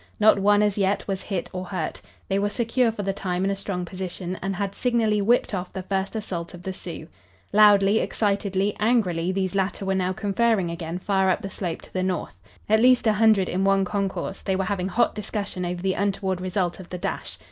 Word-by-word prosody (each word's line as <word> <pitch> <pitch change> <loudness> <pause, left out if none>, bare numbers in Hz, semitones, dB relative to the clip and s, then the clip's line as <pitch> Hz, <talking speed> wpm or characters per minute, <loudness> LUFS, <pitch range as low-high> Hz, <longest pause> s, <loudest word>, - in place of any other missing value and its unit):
Not 215 -1 +6
one, 205 +1 +4
as 210 -1 +1
yet, 195 +1 +1
was 195 -1 -2
hit 195 -4 -3
or 185 0 -3
hurt. 185 0 -4 0.3
They 195 0 +1
were 205 +1 +1
secure 235 +2 +1
for 210 -2 -5
the 195 0 -1
time 185 -1 -2
in 195 - +1
a - - 0
strong 195 -2 -4
position, 185 0 -5
and 195 0 -2
had 200 +1 -2
signally 225 -4 +1
whipped 230 +2 +2
off 180 -1 -3
the 190 0 -5
first 195 +2 -2
assault 180 -6 -4
of 175 - -12
the 190 - -4
Sioux. 165 -3 -8 0.5
Loudly, 205 0 +6
excitedly, 200 -1 0
angrily 185 -7 +2
these 190 0 -1
latter 195 0 -1
were 195 - +1
now 185 -1 0
conferring 200 -1 +1
again 170 0 -4
far 190 0 +1
up 185 - 0
the 195 - -5
slope 175 -4 -4
to - - -15
the 185 - 0
north. 185 -1 -2 0.3
At 220 +1 +4
least 250 0 +5
an 215 - +5
hundred 210 -3 +4
in 185 +2 -1
one 195 0 +3
concourse, 195 0 -3
they 190 - -1
were 190 - 0
having 185 -1 -1
hot 235 +5 +2
discussion 205 -3 -4
over 175 0 -4
the 190 -1 +2
untoward 195 -2 -1
result 185 -1 -1
of 185 - -10
the 180 - -5
dash. - - -4
195 Hz, 220 wpm, -24 LUFS, 185-205 Hz, 0.5 s, Not